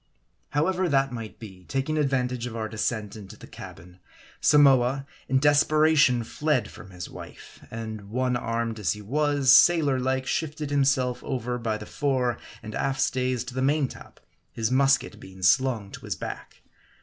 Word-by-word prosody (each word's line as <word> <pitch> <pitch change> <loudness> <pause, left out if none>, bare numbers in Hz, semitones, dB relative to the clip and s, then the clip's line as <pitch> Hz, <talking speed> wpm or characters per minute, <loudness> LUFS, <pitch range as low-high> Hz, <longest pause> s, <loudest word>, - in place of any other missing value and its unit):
However 180 +5 0
that 135 -2 +2
might 115 -3 -7
be, 95 -5 -12
taking 135 +3 -2
advantage 125 -4 0
of 115 - -7
our 110 -1 -3
descent 110 -1 -3
into 105 0 -11
the - - -12
cabin, 90 +2 -12 0.4
Samoa, 135 -2 +4 0.2
in 135 - +3
desperation 145 -2 +4
fled 150 +1 -1
from 95 - -12
his 90 -2 -8
wife, - - -12
and 110 -3 -7
one 125 +2 0
armed 115 -1 -2
as 90 -5 0
he 105 - -10
was, 145 +2 +3
sailor 155 -6 +5
like, 130 +1 -1
shifted 155 -2 -3
himself 135 -3 +1
over 125 -1 -3
by 110 -2 -2
the 105 - -9
fore 130 -4 -1 0.2
and 110 - -7
aft 135 +2 -1
stays 125 -2 0
to 125 0 -9
the 130 - -2
main 140 +1 +2
top, - - -13 0.3
his 115 +1 -2
musket 135 0 +2
being 95 0 -12
slung 110 +1 +2
to - - -10
his - - -3
back. - - -8
130 Hz, 165 wpm, -26 LUFS, 110-140 Hz, 0.4 s, sailor